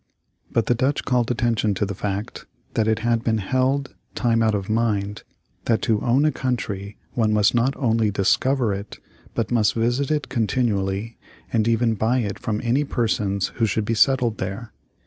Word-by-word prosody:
But 115 - +1
the - - +3
Dutch 130 +4 0
called 125 -3 +1
attention 115 -4 +1
to 105 - 0
the 100 - -4
fact 100 +2 -4 0.3
that 110 -1 +1
it 110 -1 +2
had 115 -1 +1
been 110 -1 +1
held, 130 +6 0 0.2
time 115 -2 +2
out 110 -1 +2
of 100 -2 -3
mind, 105 -2 0 0.4
that 115 -2 +1
to 110 -2 +1
own 130 +5 +3
a 155 - +3
country 105 -7 -3
one 110 -3 +1
must 105 0 +3
not 125 +3 +2
only 115 -4 +2
discover 115 +4 +1
it, 100 +2 -7 0.4
but - - -1
must 110 -3 +2
visit 120 +4 0
it 150 -1 0
continually, 110 -3 -1 0.3
and 110 -1 +2
even 115 0 +2
buy 110 +4 +1
it 105 -5 -2
from 110 -2 -2
any 125 +5 +2
persons 105 -7 0
who 115 -2 +2
should 105 +1 -1
be 115 - 0
settled 120 -1 +2
there. 100 +5 -5
115 Hz, 180 wpm, -23 LUFS, 105-120 Hz, 0.4 s, the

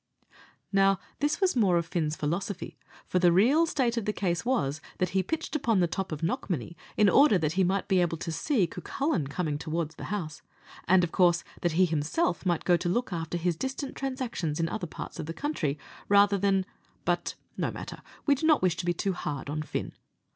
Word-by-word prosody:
Now, 195 0 +4 0.2
this 290 +1 +1
was 380 -5 +2
more 195 -7 +4
of 170 - 0
Fin's 160 -2 -1
philosophy; 175 +6 -3 0.3
for 180 - +1
the 175 -1 +5
real 260 - +4
state 245 -7 0
of 225 - -1
the 210 - +1
case 175 -5 -1
was, 155 - 0 0.2
that 185 - 0
he 190 - +1
pitched 315 - -3
upon 235 -8 +2
the 175 - +4
top 185 +2 -3
of 155 +1 -5
Knockmany 170 - -2 0.2
in 210 - +5
order 265 +1 +6
that 155 -3 0
he 190 +3 +2
might 190 +2 0
be 190 -3 +3
able 170 -1 0
to 165 - -4
see 210 - +1
Cucullin 180 - -2
coming 150 0 -2
towards 160 0 -2
the - - -8
house, 175 -7 -4 0.5
and, 185 0 +5
of 170 - -1
course, 175 -2 +3 0.2
that 175 -2 +1
he 185 +3 +5
himself 165 - 0
might 175 -2 0
go 175 -1 +5
to 175 +1 -2
look 240 +2 -1
after 165 0 -3
his 175 0 0
distant 265 - -4
transactions 255 - -3
in 165 - +1
other 195 -3 -3
parts - - -8
of - - -4
the 165 - -4
country, 170 - -1 0.3
rather 200 0 +5
than 195 -1 +2 0.4
but - - 0 0.2
no - - -1
matter - - -7 0.2
we 285 - +5
do 280 +3 0
not 310 -10 +4
wish 180 -2 +2
to 175 - -3
be 175 - +2
too 195 +3 -1
hard 145 -5 -4
on 155 +1 -2
Fin. 155 - -4
180 Hz, 210 wpm, -28 LUFS, 165-220 Hz, 0.5 s, order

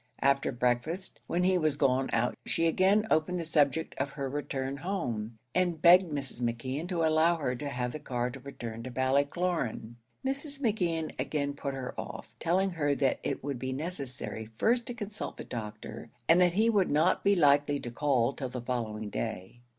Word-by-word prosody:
After 140 0 +3
breakfast, 125 +9 -1
when 175 +1 +1
he 185 0 +3
was 155 -3 +2
gone 135 -2 +2
out, 115 +2 +1
she 165 - 0
again 190 +6 +4
opened 175 +3 +2
the - - -2
subject 155 0 +2
of 135 +1 0
her 140 -2 -3
return 135 -1 -3
home, 120 - -3 0.2
and 175 -3 +1
begged 175 +1 +7
Mrs. 135 -4 -4
McKeon 130 +7 -2
to 170 -3 0
allow 160 +2 +4
her 140 -6 -1
to 145 +2 -4
have 125 -2 -2
the 155 - -6
car 125 -3 -2
to 135 - -9
return 120 -4 -7
to 130 - -6
Ballycloran. 135 -2 0 0.3
Mrs. 275 +1 -3
McKeon 175 - 0
again 145 -2 -1
put 140 -1 -4
her 130 -2 -5
off, - - -9
telling 190 +3 +2
her 145 -4 +1
that 135 -1 +1
it - - -3
would 140 -3 -3
be 130 +1 -3
necessary 135 -7 -4
first 235 +2 +2
to 245 - -4
consult 210 -2 -5
the - - -6
doctor, 110 0 -7 0.2
and 170 +2 +6
that 175 -1 +4
he 215 +5 +3
would 205 -5 +3
not 155 +5 +3
be 200 0 +4
likely 145 -3 +4
to 120 - -5
call 135 -1 +2
till 130 -2 -4
the 125 0 -5
following 110 -4 -3
day. 95 - -4
145 Hz, 190 wpm, -30 LUFS, 125-175 Hz, 0.3 s, begged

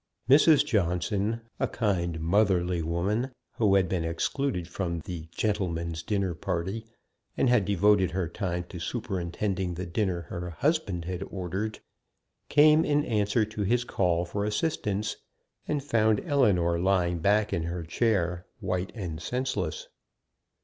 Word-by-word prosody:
Mrs. 145 +2 +6
Johnson, 100 - 0 0.2
a - - +1
kind, 85 -7 -1
motherly 90 0 +2
woman, 95 +10 -1 0.3
who 105 -4 +4
had 95 -2 +3
been 90 -3 -1
excluded 90 - -1
from 85 -2 -3
the 80 0 -7
"gentleman's 85 -6 -1
dinner 100 -3 -1
party," 95 +6 -3 0.5
and 130 - +3
had 120 -5 +4
devoted 100 -1 +3
her 90 -1 -2
time 90 0 -3
to 90 - -7
superintending 95 -2 -2
the 90 +2 -4
dinner 90 0 -1
her 85 +3 -6
husband 100 - -1
had 90 0 -4
ordered, 95 +3 -4 0.7
came 155 +2 +6
in 145 0 +2
answer 105 0 +1
to 110 0 -6
his 120 +5 +2
call 90 -6 +1
for 100 +4 -3
assistance, 105 -3 -1 0.5
and 145 -2 -1
found 110 -6 +2
Ellinor 100 - +2
lying 90 -2 +2
back 105 +4 +2
in 85 - 0
her 85 0 -3
chair 90 -1 0
white 90 +1 -2
and 85 -7 -5
senseless. 105 -4 -2
95 Hz, 135 wpm, -28 LUFS, 85-110 Hz, 0.7 s, Mrs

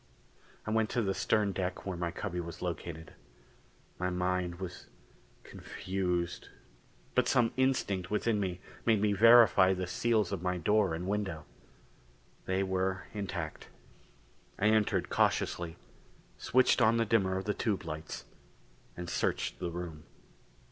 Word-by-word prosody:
I 110 - -3
went 110 0 +2
to 120 - 0
the 95 -1 0
stern 105 +1 +1
deck 95 -1 -3
where 95 -2 -3
my 85 0 -2
cubby 90 0 -4
was 85 0 -6
located. 85 -2 -5 0.9
My 90 0 0
mind 90 -1 -1
was 90 -1 -7 0.6
confused 90 -2 -3 0.6
but - - +3
some 115 -2 +3
instinct 115 -9 0
within 105 0 +1
me 90 -2 -3 0.2
made 110 -3 +3
me 105 0 +2
verify 105 -3 +7
the 90 0 -2
seals 110 +1 +1
of 95 -4 -3
my 90 0 -1
door 100 0 +2
and 85 +2 -5
window. 95 -6 -2 1.0
They 95 +1 +1
were 95 0 -1
intact. 100 -3 -5 0.9
I 105 - +3
entered 110 -1 +2
cautiously, 85 -2 0 0.6
switched 130 0 +3
on 115 0 +5
the 115 - +2
dimmer 95 -4 +2
of 95 - -4
the 105 - 0
tube 100 -4 -1
lights, 80 0 -6 0.7
and 90 0 -5
searched - - -1
the 90 - -2
room. 85 -3 -7
95 Hz, 140 wpm, -31 LUFS, 90-105 Hz, 1.0 s, verify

